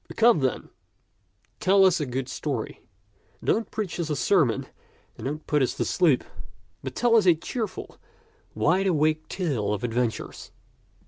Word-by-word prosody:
Come, 230 -6 +5
then, 130 -4 -2 0.9
tell 195 +1 +5
us 180 -2 +3
a 150 - -2
good 125 +1 -3
story. 135 -5 -4 0.6
Don't 225 - +1
preach 200 -5 -4
us 165 -2 -2
a 150 - 0
sermon, 140 - +2 0.5
and - - -9
don't 150 +3 -5
put 150 -2 +1
us 130 - 0
to - - -1
sleep, 160 -8 +2 0.6
but 130 -1 -6
tell 240 -1 +3
us 205 -4 +3
a 175 - +7
cheerful, 210 +5 -5 0.6
wide 195 +1 +2
awake 155 -2 +1
tale 125 - -1
of 105 - -8
adventures. 120 -1 -3
155 Hz, 150 wpm, -25 LUFS, 130-190 Hz, 0.9 s, a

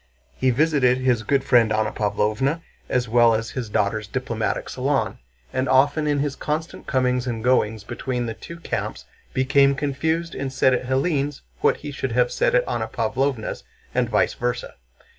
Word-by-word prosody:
He 130 - +1
visited 130 -2 +3
his 130 -3 +1
"good 135 +5 +1
friend 120 -4 +4
Anna 110 -1 +1
Pávlovna" 110 +9 0 0.3
as 125 -1 +1
well 115 0 +5
as 115 +1 -3
his 125 -4 -4
daughter's 105 0 0
"diplomatic - - -2
salon," - - -1 0.3
and 130 +1 0
often 145 +3 +3
in 145 -1 +2
his 140 -1 -1
constant 155 +2 -4
comings 125 -1 +1
and 115 -2 -3
goings 110 -4 +2
between 120 +2 -3
the 115 - -3
two 170 +9 -10
camps 110 - -4 0.3
became 140 +1 +4
confused 160 +4 -1
and 135 -1 -4
said 130 0 +3
at 125 0 -1
Hélène's 140 +1 0 0.2
what - - +3
he 145 - -4
should 135 -3 -3
have 125 0 +2
said - - +1
at - - +3
Anna - - -1
Pávlovna's 125 +1 -1 0.3
and - - +1
vice - - +2
versa. 120 0 -3
130 Hz, 170 wpm, -23 LUFS, 115-140 Hz, 0.3 s, well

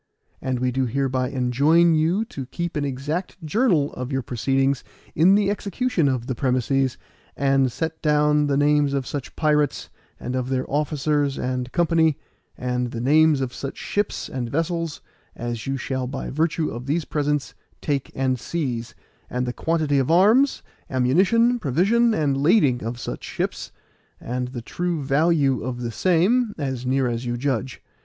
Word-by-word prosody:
And 130 -1 -1
we 125 +1 0
do 130 0 0
hereby 130 0 0
enjoin 140 +6 +3
you 165 +7 +2
to 140 - -7
keep 170 +4 -4
an 150 - 0
exact 145 +8 -3
journal 170 - +2
of 125 +2 -5
your 135 -1 -1
proceedings 135 +3 0 0.3
in 180 +6 +5
the 205 -1 +2
execution 205 - 0
of 125 -3 -1
the 130 - -2
premisses, 130 +1 0 0.4
and 135 -2 +2
set 160 +5 -4
down 150 -1 +3
the 140 -1 +1
names 145 -1 +3
of 135 -2 -1
such 145 0 -6
pirates, 150 -2 +1 0.3
and 125 +1 -4
of 130 0 -2
their 130 -1 0
officers 145 -1 0
and 125 0 -3
company, 165 -3 +2 0.4
and 125 -1 -2
the 120 -2 -5
names 150 +3 +4
of 130 -2 -3
such 135 - -6
ships 205 +1 -2
and 125 -3 -4
vessels 165 +2 -2 0.3
as 120 +1 -5
you 135 0 -1
shall 130 0 -3
by 135 +1 -5
virtue 155 +2 0
of 120 +3 -7
these 155 +2 0
presents 150 -1 -1 0.3
take 140 -3 -2
and 130 -1 0
seize, 120 -7 -3 0.3
and 125 0 -2
the 125 - -3
quantities 155 -3 +1
of 130 - -2
arms, 215 +11 +4 0.3
ammunition, 190 - +3
provision, 205 - +2
and 145 -9 +1
lading 145 - +3
of 115 +2 -4
such - - -6
ships, - - -4 0.5
and 125 +1 -3
the 125 -2 -7
true 175 +2 -2
value 140 -2 +2
of 125 0 -4
the 120 -1 -3
same, 190 - +2
as 130 -4 -3
near 130 +1 +2
as 120 0 -2
you 120 -1 -2
judge. 130 -2 -2
140 Hz, 165 wpm, -23 LUFS, 130-160 Hz, 0.5 s, in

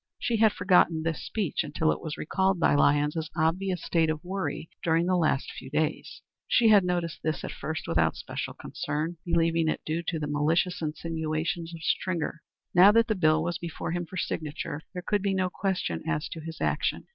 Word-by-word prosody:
She 235 - 0
had 220 -1 +5
forgotten 175 -5 +3
this 165 -1 -2
speech 205 -8 -1
until 155 +2 +1
it - - -3
was 155 -3 -5
recalled 190 +3 +1
by - - +4
Lyons's 150 +2 +2
obvious 175 +3 0
state 165 -2 +2
of 155 -1 -2
worry 190 -2 -3 0.2
during 165 0 +2
the 185 0 +2
last 155 -6 +1
few 130 - -9
days. 150 +1 -2 0.2
She 230 -3 +4
had 205 -3 +7
noticed 175 -3 -2
this 155 0 -2
at - - -4
first 160 +1 -5
without 80 -1 +2
special - - -5
concern, 160 +4 -4
believing 165 -1 +2
it 155 - -1
due 160 +2 -1
to 165 - 0
the 155 - -3
malicious 160 +5 +1
insinuations 160 +1 -3
of 160 - -10
Stringer. 170 -2 -1 0.3
Now 185 +3 +8
that 230 +1 +4
the - - +3
bill 160 -4 +3
was 170 0 -2
before 170 -2 -5
him 175 0 -2
for 185 - -8
signature 155 -3 -3
there 180 -1 -5
could 205 +2 0
be 195 -1 0
no 185 -1 0
question 185 - -2
as 150 - -1
to 160 - -7
his 160 +1 -8
action. - - 0
165 Hz, 195 wpm, -28 LUFS, 155-180 Hz, 0.3 s, Now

